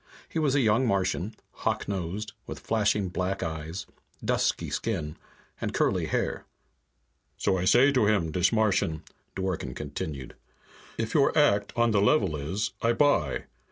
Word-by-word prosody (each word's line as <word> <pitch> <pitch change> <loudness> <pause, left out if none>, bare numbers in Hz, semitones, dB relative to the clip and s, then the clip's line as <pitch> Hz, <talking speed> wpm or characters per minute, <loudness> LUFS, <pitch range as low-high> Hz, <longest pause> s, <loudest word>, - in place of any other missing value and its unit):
He 165 - -3
was 145 -3 +2
a 140 - +4
young 115 +2 +3
Martian, 100 0 0 0.2
hawk - - -2
nosed, 100 +2 -3
with - - -6
flashing 105 -3 +1
black 90 +2 -2
eyes, 80 +2 -5 0.4
dusky - - 0
skin, 80 -10 -2 0.5
and - - -2
curly - - +1
hair. - - -1 0.9
"So 95 - +1
I 90 - -1
say 125 +8 +6
to 125 -6 +3
him, 95 -7 +2
dis 90 +3 +2
Martian," 100 -8 +1 0.3
Dworken 95 -9 -3
continued, 70 -5 -5 0.6
"'If 115 0 -2
your 145 0 +3
act 100 -9 +3
on 120 -1 +3
the 105 -2 +3
level 100 - +3
is, 95 +8 -2
I 115 +1 +3
buy.' 120 - +2
100 Hz, 150 wpm, -27 LUFS, 85-115 Hz, 0.9 s, say